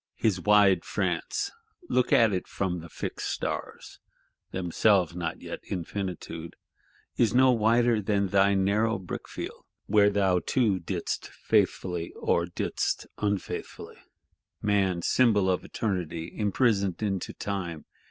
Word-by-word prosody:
His 95 -5 0
wide 100 -3 +5
France, 100 - -2 0.4
look 125 -1 +1
at 110 -3 +5
it 90 - -2
from 90 -3 -2
the 85 0 -10
Fixed - - -4
Stars - - -5 0.5
(themselves 90 0 +2
not 85 -2 -4
yet - - -6
Infinitude), 90 -3 -5 0.6
is 115 -1 +2
no 130 0 +6
wider 115 0 +3
than 100 -1 0
thy 100 +1 +4
narrow 105 +4 +2
brickfield, 95 -2 -7 0.2
where 105 0 +5
thou 95 -3 +2
too 105 0 +1
didst 85 - -3
faithfully, 90 -2 0
or 85 0 0
didst 85 - -2
unfaithfully. 100 -2 -3 0.6
Man, 95 -4 +1
"Symbol 110 -6 +3
of 90 -1 +1
Eternity 85 -6 -3
imprisoned 105 -3 +1
into 95 -4 -2
Time!" 90 -6 -4
100 Hz, 120 wpm, -27 LUFS, 90-105 Hz, 0.6 s, no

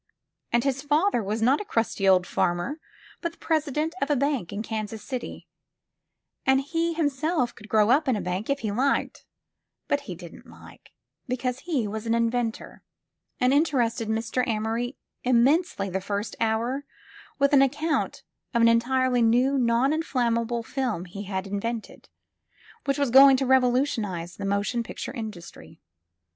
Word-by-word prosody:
And 235 0 +2
his 275 -1 0
father 295 +1 +2
was 215 +2 -2
not 265 - +3
a - - -4
crusty 225 - 0
old 185 -1 +5
fanner, 175 - -1 0.4
but 340 -2 -3
the - - -22
president 310 0 -1
of 280 - 0
a 295 - +3
bank 275 - -1
in 200 +2 -4
Kansas 220 -1 -5
City; 255 -3 -6 1.0
and 265 0 +4
he 330 +4 -1
him 320 -2 +1
self 290 -2 -1
could 210 +1 -14
grow 215 +1 +4
up 290 +3 +3
in 255 - +3
the 210 - -2
bank, 185 +6 -3
if 280 0 0
he 215 -3 -2
liked, 260 +7 0 0.6
but - - +1
he - - -4
didn't - - -12
like, - - -15 0.4
because 250 0 -2
he 290 -11 -1
was 220 +2 -5
an 225 - +2
inventor, 230 0 -2 0.6
and 255 +1 +3
interested 250 -7 +1
Mr. 225 +3 -1
Amory 230 +3 -2 0.3
immensely, 255 - +2
the 190 0 -3
first 205 +2 -3
hour, 230 +5 0 0.5
with 280 0 +2
an 275 - +7
account 295 +4 0 0.3
of 235 - +4
an - - +7
entirely 250 +2 +2
new 245 +4 +3
noninflammable 240 -2 +1
film 245 -11 -2
he 195 +3 -8
had 190 -1 -3
invented, 215 +3 -5 0.8
which 275 0 0
was 280 -4 0
going 270 +1 +8
to 270 - 0
revolutionize 245 - +1
the 200 - -5
motion 200 +4 0
picture 230 - -6
industry. 210 - -9
240 Hz, 155 wpm, -26 LUFS, 220-275 Hz, 1.0 s, going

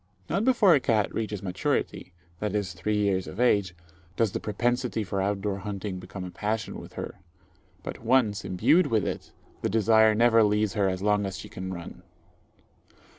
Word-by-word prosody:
Not 195 +6 +1
before 230 -7 +5
a 145 - +5
cat 110 -5 +1
reaches 105 -3 -3
maturity 95 0 -2 0.3
viz., 105 -3 -2
three 105 +5 -1
years 100 -3 +1
of 100 - -8
age 100 -7 +2 0.4
does 115 -4 +1
the - - -3
propensity 120 +2 -1
for 100 -1 -2
out 100 0 -1
door 100 -1 -2
hunting 100 -1 -5
become 90 +1 -8
a 90 - -6
passion 110 +3 -3
with - - -12
her; - - -7 0.6
but - - -7
once 115 -4 +2
imbued 145 - +3
with 110 -5 +1
it, - - -5 0.3
the - - 0
desire 110 0 +4
never 115 0 +5
leaves 105 -1 +1
her 100 -2 +2
as 95 +1 -3
long 105 -1 +2
as 95 -1 -5
she - - -9
can 95 0 -6
run. 85 -2 -8
105 Hz, 175 wpm, -27 LUFS, 95-115 Hz, 0.6 s, before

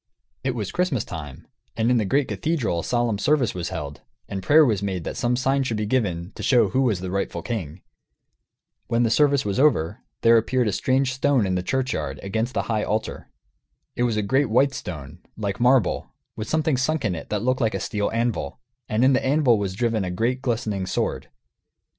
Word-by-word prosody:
It 130 -1 -1
was 105 -5 -3
Christmas 175 - 0
time, 75 -5 -8 0.3
and 115 +2 +2
in 125 - +4
the 110 - +1
great 135 +7 +1
cathedral 145 - -1
a - - -4
solemn 120 -4 0
service 140 0 +2
was 90 -2 -4
held, 75 -2 -6 0.3
and 95 - -4
prayer 150 +9 +6
was 105 -7 +1
made 95 -4 -2
that - - -5
some 120 +1 0
sign 135 +2 +1
should 120 -5 -1
be 105 - -1
given, 100 -7 -1
to - - -9
show 125 -3 +4
who 130 - +1
was 110 -9 +1
the 90 -1 -4
rightful 100 +1 -2
king. 90 -8 -5 1.0
When 120 0 +2
the 115 - +1
service 140 -1 +3
was 100 +3 -1
over, 110 - +2 0.2
there 115 0 +6
appeared 120 +2 +1
a - - +1
strange 130 +5 +1
stone 130 -3 +2
in 95 - -1
the 90 - 0
churchyard, 90 - -2
against 110 +6 -2
the - - +1
high 110 -2 -1
altar. 110 +1 -3 0.7
It - - -3
was 120 -3 +1
a 105 - +1
great 130 +6 +1
white 135 +5 +3
stone, 75 - -7 0.2
like 100 -3 -3
marble, 125 -3 +2 0.3
with 110 - -5
something 155 -3 +1
sunk 140 +1 0
in 95 - +1
it 80 - -7
that 105 0 -1
looked 130 +2 +1
like 110 -2 +1
a - - -1
steel 105 -2 -1
anvil; 115 +2 -2 0.3
and 110 +4 +2
in 135 - +5
the 130 - +1
anvil 130 -5 +3
was 95 -2 -3
driven 115 -2 0
a 90 - -3
great 115 +8 -1
glistening 110 -7 -2
sword. 90 - -2
115 Hz, 210 wpm, -24 LUFS, 100-130 Hz, 1.0 s, prayer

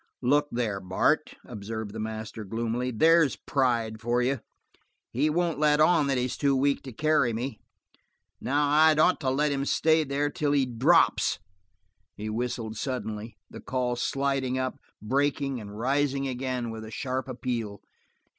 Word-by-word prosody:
"Look 145 +4 +3
there, 115 -5 -1
Bart," 95 0 0
observed 110 0 -6
the 110 - -6
master 110 0 -5
gloomily. 115 +4 -2
"There's 160 +5 +4
pride 115 -5 -1
for 120 +1 +1
you. 130 +2 0 0.7
He 145 +6 +1
won't 170 -1 0
let 150 -1 +3
on 155 -2 +4
that 135 -2 +1
he's 125 0 -2
too 140 -1 +2
weak 140 +1 +1
to 130 - -7
carry 150 -2 +2
me. 120 +1 -4 0.8
Now 145 +3 +1
I'd 155 +1 +5
ought 170 +4 +4
to 130 - -1
let 145 +3 +1
him 140 -1 -1
stay 160 +2 +3
there 145 +1 -1
till 145 -1 0
he 140 -2 +3
drops." 120 -3 +3 0.8
He 110 +1 -5
whistled 115 -1 -3
suddenly, 110 -4 -4
the - - -11
call 125 -1 -1
sliding 135 0 -1
up, 130 0 -3 0.2
breaking, 140 +1 0
and 105 0 -9
rising 135 +3 0
again 125 -2 -3
with 110 -1 -7
a 110 - -8
sharp 130 +2 -3
appeal. 120 -5 -4
130 Hz, 155 wpm, -27 LUFS, 115-145 Hz, 0.8 s, I'd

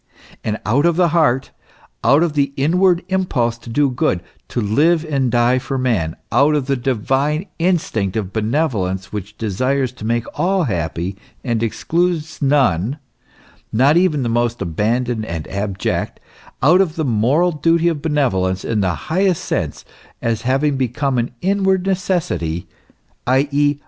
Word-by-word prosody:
And 110 0 -2
out 140 +9 +3
of 170 - +2
the 175 0 +3
heart, 150 -6 +2 0.5
out 140 +7 +5
of 170 -3 0
the 140 -2 0
inward 175 +5 +3
impulse 145 -12 0
to 120 - -11
do 140 +3 +2
good, 95 -7 0 0.2
to - - -3
live 155 +10 +2
and 135 -4 0
die 120 +2 +3
for 135 +1 -4
man, 110 -11 0 0.2
out 140 +5 +4
of 145 -3 0
the 135 0 0
divine 135 - 0
instinct 135 - 0
of 100 -3 -3
benevolence 105 - -1
which 105 0 -6
desires* 130 +5 0
to 125 - -12
make 115 +1 0
all 190 +1 +2
happy, 90 - -2 0.3
and 115 -4 -1
excludes 160 +7 -1
none, 135 - +2 0.7
not 135 +7 +4
even 170 -6 +2
the - - -1
most 120 0 0
abandoned 110 +6 -1
and 85 -6 -5
abject, 100 -1 -2 0.4
out 175 +7 +6
of 170 -4 0
the 160 - -1
moral 130 +9 +2
duty 165 +2 +2
of 160 -4 0
benevolence 95 - 0
in 115 -2 0
the 90 -3 0 0.2
highest 185 0 +1
sense, - - -3 0.3
as 115 -1 -1
having 135 +3 +1
become 130 +1 0
an 120 - -1
inward 190 -1 +1
necessity, 175 - -1 0.6
i.e. 145 +2 +2
135 Hz, 150 wpm, -19 LUFS, 110-160 Hz, 0.7 s, out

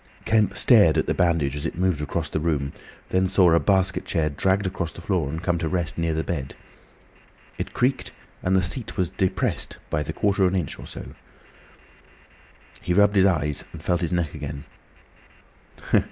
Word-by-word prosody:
Kemp 110 -3 +2
stared - - +5
at - - +2
the - - 0
bandage 80 -6 +1
as 75 - -4
it - - -7
moved 90 -4 +1
across 75 - -3
the - - -1
room, 75 -4 -1 0.4
then 95 0 +2
saw 90 -2 +5
a 85 - +5
basket 95 -1 +1
chair 80 -4 0
dragged 95 +7 +1
across 95 -3 -3
the - - -12
floor 85 -5 -1
and 80 +4 -5
come 90 -2 0
to 80 - -1
rest 85 -3 -1
near 85 -1 -1
the 80 - -1
bed. 70 -6 -4 1.0
It - - -5
creaked, 130 +2 0 0.3
and 95 +1 +1
the 95 - +3
seat 110 +6 -3
was 90 -2 0
depressed 95 -1 -1
the 75 +1 -1
quarter 100 +3 +1
of 90 - +1
an - - +3
inch 75 - -5
or - - -9
so. - - -9 1.7
He 90 - -1
rubbed 100 +1 +4
his 95 0 +6
eyes 75 -6 0
and 80 -1 -10
felt 90 0 0
his 85 - -1
neck 85 -4 -1
again. 70 -1 -6
85 Hz, 185 wpm, -24 LUFS, 80-95 Hz, 1.7 s, his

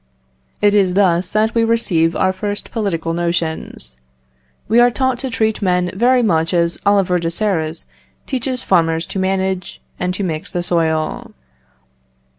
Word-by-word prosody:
It 205 0 +5
is 190 -3 +3
thus 180 -2 +2
that 215 +2 +1
we 230 - +2
receive 180 -8 +1
our 185 0 +1
first 205 +2 -4
political 170 -7 -2
notions. 170 - -3 0.7
We 225 +3 +4
are 240 0 +6
taught 260 0 -1
to 265 - -3
treat 220 -2 0
men 180 -2 +1
very 245 +5 +3
much 165 -4 +1
as 170 0 +1
Oliver 195 -3 +3
de 165 -1 -1
Serres 165 -4 -2 0.4
teaches 255 -1 -3
farmers 165 -1 +2
to 195 - -5
manage 190 -1 -1 0.2
and 180 0 -1
to 200 - -3
mix 160 -4 -4
the 175 -2 -2
soil. 160 -3 -1
185 Hz, 150 wpm, -18 LUFS, 170-215 Hz, 0.7 s, are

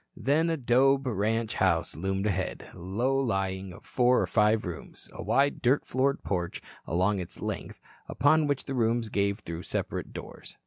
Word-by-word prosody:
Then 155 +5 +2
a 165 - 0
'dobe 135 +2 +3
ranch 115 0 0
house 85 -3 +1
loomed 95 +3 -2
ahead, 95 -3 -2
low 100 +9 -1
lying, 95 -6 -1
of 95 - -13
four 125 0 +3
or - - +2
five 105 0 +2
rooms, 85 -3 -7
a - - -7
wide, 135 +9 +2
dirt 130 +4 +2
floored 135 +2 0
porch 90 -3 -2 0.3
along 95 +4 +1
its 90 - -7
length, - - -5 0.3
upon 150 +3 +3
which 145 -2 -1
the 135 - -4
rooms 115 -2 +1
gave 100 +1 0
through 85 -3 -6
separate - - -3
doors. - - -10
110 Hz, 170 wpm, -28 LUFS, 95-130 Hz, 0.3 s, dobe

